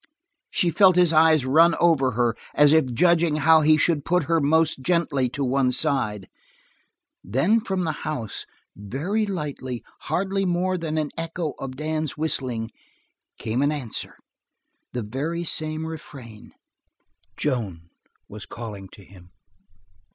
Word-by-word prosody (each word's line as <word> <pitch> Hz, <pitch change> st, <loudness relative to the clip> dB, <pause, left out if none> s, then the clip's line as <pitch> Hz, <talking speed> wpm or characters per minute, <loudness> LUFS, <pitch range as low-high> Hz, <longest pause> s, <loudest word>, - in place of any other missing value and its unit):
She 175 Hz, -, +1 dB
felt 185 Hz, +1 st, +5 dB
his 175 Hz, -2 st, +4 dB
eyes 155 Hz, -3 st, +4 dB
run 165 Hz, +5 st, +5 dB
over 135 Hz, -7 st, +3 dB
her, 120 Hz, 0 st, +1 dB, 0.2 s
as 150 Hz, 0 st, +5 dB
if 155 Hz, -5 st, +3 dB
judging 170 Hz, +3 st, +3 dB
how 160 Hz, +1 st, +5 dB
he 155 Hz, 0 st, +4 dB
should 155 Hz, -1 st, +1 dB
put 180 Hz, 0 st, +1 dB
her 165 Hz, +2 st, +1 dB
most 155 Hz, 0 st, +2 dB
gently 145 Hz, -5 st, 0 dB
to 140 Hz, +3 st, -4 dB
one 130 Hz, 0 st, +1 dB
side; 120 Hz, -, 0 dB, 1.0 s
then 140 Hz, -, +2 dB
from 190 Hz, -4 st, -2 dB
the 160 Hz, -, -1 dB
house, 125 Hz, -9 st, -5 dB, 0.3 s
very 155 Hz, -, -2 dB
lightly, 145 Hz, -9 st, -5 dB, 0.3 s
hardly 195 Hz, +1 st, 0 dB
more 185 Hz, 0 st, 0 dB
than 160 Hz, -3 st, -3 dB
an 155 Hz, -2 st, -1 dB
echo 165 Hz, -2 st, -3 dB
of 130 Hz, -1 st, -6 dB
Dan's 155 Hz, +1 st, -3 dB
whistling, 125 Hz, -7 st, -2 dB, 0.7 s
came 115 Hz, +4 st, -2 dB
an 145 Hz, +1 st, +2 dB
answer 135 Hz, -8 st, -3 dB, 0.8 s
the 125 Hz, -, -4 dB
very 150 Hz, +10 st, -3 dB
same 155 Hz, -1 st, -2 dB
refrain. 140 Hz, -9 st, -10 dB, 0.8 s
Joan 100 Hz, -, -3 dB, 0.4 s
was 105 Hz, -1 st, -10 dB
calling 105 Hz, -5 st, -8 dB
to 100 Hz, -, -14 dB
him. 90 Hz, -2 st, -17 dB
150 Hz, 135 wpm, -24 LUFS, 125-165 Hz, 1.0 s, felt